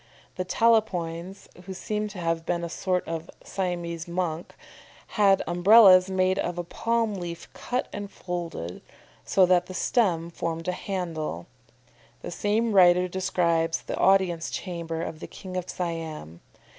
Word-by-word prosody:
The 185 - -3
Talapoins 190 -5 0 0.2
(who 190 0 -7
seem 210 +2 -3
to 205 -2 -10
have 165 -1 -1
been 170 0 -2
a 170 - -3
sort 180 +1 -1
of 165 0 -5
Siamese 175 -3 -3
monks) 170 -2 -3 0.5
had 200 -3 +3
Umbrellas 185 +1 +7
made 185 0 +1
of 175 0 -2
a 175 - -2
palm 230 +4 -1
leaf 175 -3 -6
cut 250 +1 -3
and 205 -1 -5
folded, 170 - -6 0.4
so 190 - +4
that 180 -1 +3
the 185 - -8
stem 175 -10 +1
formed 165 0 -4
a - - +2
handle. 165 - -4 0.8
The - - -5
same 215 +6 0
writer 180 -2 +5
describes 170 -3 0
the - - -4
audience 185 -4 +3
chamber 170 -3 -4
of 155 - -6
the - - -7
King 185 -1 -9
of 180 -1 -3
Siam. 160 - -5
180 Hz, 145 wpm, -26 LUFS, 165-195 Hz, 0.8 s, Umbrellas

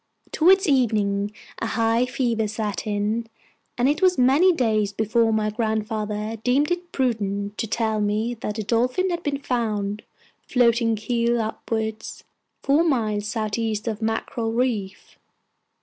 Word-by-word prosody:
Towards 380 +4 +4
evening 210 -7 +1 0.3
a 225 - -2
high 230 +2 +1
fever 235 -3 0
set 210 -2 -3
in, 210 +2 -1 0.5
and 245 +1 +2
it 295 +5 +1
was 370 -1 +4
many 275 +9 +5
days 220 - +1
before 225 +2 +2
my 215 -1 +1
grandfather 215 -1 -2
deemed 280 +6 +2
it 350 0 -3
prudent 205 -5 -1
to 225 - -1
tell 220 0 0
me 210 +3 0
that 210 - -3
the 215 - -3
Dolphin 250 - +1
had 340 -1 -2
been 290 -3 -1
found, 215 -5 -2 0.5
floating 235 -2 +3
keel 235 +2 0
upwards, 220 0 -4 0.4
four 285 +4 +3
miles 215 -9 0
southeast 220 0 -2
of 220 -1 -3
Mackerel 225 +1 -2
Reef. 225 -5 -2
225 Hz, 135 wpm, -23 LUFS, 215-250 Hz, 0.5 s, many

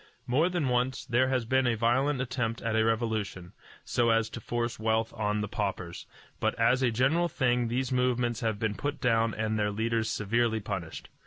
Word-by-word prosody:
More 150 +8 +2
than 175 -6 -1
once 125 +1 0
there 125 +2 +2
has 130 -3 0
been 130 +2 +2
a 120 - +2
violent 125 +5 +1
attempt 120 -2 -2
at 115 -1 0
a 110 - +3
revolution, 110 -5 -1 0.3
so 120 -1 +1
as 115 0 +2
to 115 - -7
force 120 +1 -2
wealth 110 0 0
on 105 -1 -1
the 105 - -2
paupers; 95 -5 -4 0.3
but - - 0
as 115 +3 +3
a 130 - +3
general 135 +9 +2
thing 125 -4 +1
these 130 +3 -1
movements 125 -2 +1
have 110 -4 -1
been 110 -1 -1
put 145 +7 -3
down 115 -2 +2
and 110 0 -1
their 105 0 +1
leaders 110 +1 -1
severely 110 +1 0
punished. 95 -6 -5
115 Hz, 190 wpm, -29 LUFS, 110-125 Hz, 0.3 s, a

